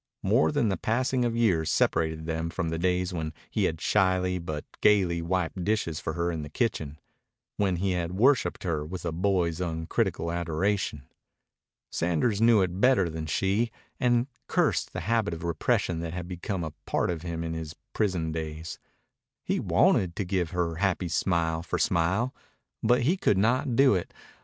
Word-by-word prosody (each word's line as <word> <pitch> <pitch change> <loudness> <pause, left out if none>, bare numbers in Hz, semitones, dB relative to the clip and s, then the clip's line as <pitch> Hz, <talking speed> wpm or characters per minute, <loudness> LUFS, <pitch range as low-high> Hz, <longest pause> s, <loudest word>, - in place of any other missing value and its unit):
More 80 +1 +3
than 115 - +1
the 95 - 0
passing 130 +3 0
of 115 -1 -1
years 90 -9 +2
separated 80 0 +1
them 80 0 -2
from 85 -1 -2
the 80 0 -2
days 90 +1 0
when 80 -2 -3 0.2
he - - +1
had 80 - -1
shyly 95 -1 +2
but 80 -3 -5 0.2
gayly 95 -5 +4
wiped 90 +1 -1
dishes 90 -6 0
for 80 - -3
her 85 +1 -1
in 80 -2 -3
the 75 - -7
kitchen, 75 - -2 0.6
when 95 -3 +1
he 95 +2 0
had 90 -1 -2
worshiped 125 +8 +2
her 80 -5 -1
with 90 +3 -6
a 85 - -1
boy's 90 -1 0
uncritical 80 0 -1
adoration. 85 -2 -1 0.9
Sanders 90 +6 0
knew 115 -3 +6
it 90 +1 -3
better 120 -10 +4
than 80 0 -5
she, 100 +8 +1 0.3
and 120 -1 +3 0.2
cursed - - +1
the - - -4
habit 105 -2 0
of 80 - -9
repression 85 0 0
that 85 -1 -4
had 90 -1 -5
become 90 +1 -4
a 80 -2 -5
part - - +1
of 85 -3 -4
him 85 -1 -4
in 80 0 -3
his 80 0 -6 0.2
prison 90 -7 0
days. 80 0 -5 0.6
He - - 0
wanted 90 -3 +3
to 100 - -2
give 90 -2 0
her 85 -3 -1
happy 95 -2 0
smile 80 -2 0
for 85 - -3
smile. 95 +10 +1 0.5
But 120 0 +3
he 170 +9 +2
could 105 - +2
not 120 +5 +2
do 135 -2 +6
it. 90 -3 -2
90 Hz, 175 wpm, -27 LUFS, 80-100 Hz, 0.9 s, knew